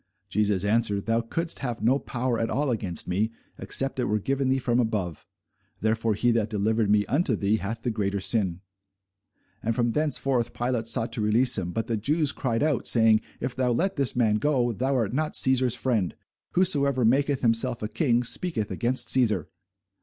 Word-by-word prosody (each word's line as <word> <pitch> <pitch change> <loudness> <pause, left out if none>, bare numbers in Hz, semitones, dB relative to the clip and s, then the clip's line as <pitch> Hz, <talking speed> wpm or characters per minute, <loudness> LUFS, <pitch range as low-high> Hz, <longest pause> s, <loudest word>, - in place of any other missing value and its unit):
Jesus 100 -1 0
answered, 105 -2 0
Thou 115 0 +1
couldest 165 +9 -2
have 120 -6 -4
no 130 +5 +3
power 125 -2 -2
at 115 - -1
all 140 0 0
against 100 -8 -4
me, 105 +5 0 0.3
except 135 -1 -1
it 125 - +1
were 105 - 0
given 135 +5 -1
thee 130 - +2
from 125 -2 0
above: 105 - -2 0.5
therefore 110 0 0
he 120 +4 +2
that 115 -2 0
delivered 110 0 0
me 105 0 +3
unto 140 - +1
thee 105 +2 +1
hath 110 +3 -5
the 120 - 0
greater 100 -2 -2
sin. 95 -3 +1 1.0
And 115 0 -1
from 120 0 +1
thenceforth 135 -3 0
Pilate 120 -2 -2
sought 115 0 0
to 115 - -2
release 115 +4 +3
him: 90 - -3
but 115 +4 -2
the 115 - -2
Jews 145 +7 +1
cried 115 -3 -1
out, 150 -4 0
saying, 110 -2 +4 0.2
If 125 -1 -4
thou 125 -1 +1
let 185 +11 0
this 140 -3 -1
man 110 -4 +2
go, 125 0 +1
thou 130 +5 -1
art 115 -4 0
not 155 +3 -1
Cæsar's 130 -2 +2
friend: 110 -9 -1 0.4
whosoever 140 -8 +2
maketh 135 +3 +2
himself 115 0 +1
a - - -1
king 120 0 +1
speaketh 120 - 0
against 120 +7 -1
Cæsar. 110 -10 +2
115 Hz, 185 wpm, -26 LUFS, 110-130 Hz, 1.0 s, saying